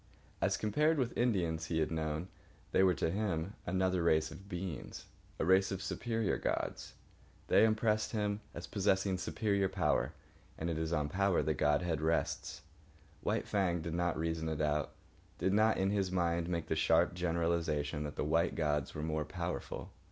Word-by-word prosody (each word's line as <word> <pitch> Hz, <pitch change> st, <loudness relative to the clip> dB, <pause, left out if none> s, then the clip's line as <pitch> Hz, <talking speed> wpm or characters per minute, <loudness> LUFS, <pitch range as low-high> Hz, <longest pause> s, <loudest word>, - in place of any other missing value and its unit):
As -, -, +2 dB
compared 150 Hz, +10 st, +2 dB
with 125 Hz, -4 st, 0 dB
the -, -, 0 dB
Indians 85 Hz, -9 st, +1 dB
he 80 Hz, -, -1 dB
had 80 Hz, 0 st, +1 dB
known, 80 Hz, +1 st, -2 dB, 0.4 s
they -, -, +4 dB
were 95 Hz, -2 st, +5 dB
to 80 Hz, -, 0 dB
him 95 Hz, -2 st, -1 dB
another 95 Hz, 0 st, +1 dB
race 80 Hz, -1 st, +2 dB
of 100 Hz, +1 st, -11 dB
beings, 90 Hz, -4 st, -5 dB, 0.3 s
a -, -, 0 dB
race 95 Hz, +2 st, +4 dB
of 95 Hz, -, -2 dB
superior 115 Hz, +2 st, -1 dB
gods. -, -, -2 dB, 0.6 s
They -, -, +6 dB
impressed 110 Hz, -1 st, +2 dB
him 105 Hz, -1 st, -1 dB
as 85 Hz, -, -5 dB
possessing 95 Hz, -2 st, +1 dB
superior 100 Hz, +1 st, 0 dB
power, 90 Hz, -5 st, +1 dB, 0.4 s
and 85 Hz, +1 st, -2 dB
it 80 Hz, -, -2 dB
is 80 Hz, 0 st, -2 dB
on 75 Hz, -3 st, +1 dB
power 95 Hz, -1 st, +2 dB
that 80 Hz, +1 st, +1 dB
godhead 75 Hz, +2 st, +1 dB
rests. 80 Hz, +1 st, -1 dB, 0.6 s
White -, -, -1 dB
Fang 90 Hz, -4 st, +1 dB
did 85 Hz, -, -4 dB
not 85 Hz, -1 st, 0 dB
reason 80 Hz, 0 st, -1 dB
it 80 Hz, -, -3 dB
out, 75 Hz, -1 st, 0 dB, 0.4 s
did 95 Hz, -, +1 dB
not 110 Hz, +1 st, +4 dB
in 95 Hz, +1 st, +1 dB
his 100 Hz, -3 st, 0 dB
mind 85 Hz, -1 st, 0 dB
make 85 Hz, -2 st, -1 dB
the -, -, -1 dB
sharp 80 Hz, +3 st, +3 dB
generalisation 85 Hz, -4 st, 0 dB
that 75 Hz, 0 st, -5 dB
the -, -, -1 dB
white 80 Hz, +3 st, +2 dB
gods 75 Hz, -3 st, 0 dB
were 75 Hz, -, -3 dB
more 80 Hz, -1 st, -1 dB
powerful. 85 Hz, +3 st, -5 dB
85 Hz, 175 wpm, -34 LUFS, 80-95 Hz, 0.6 s, They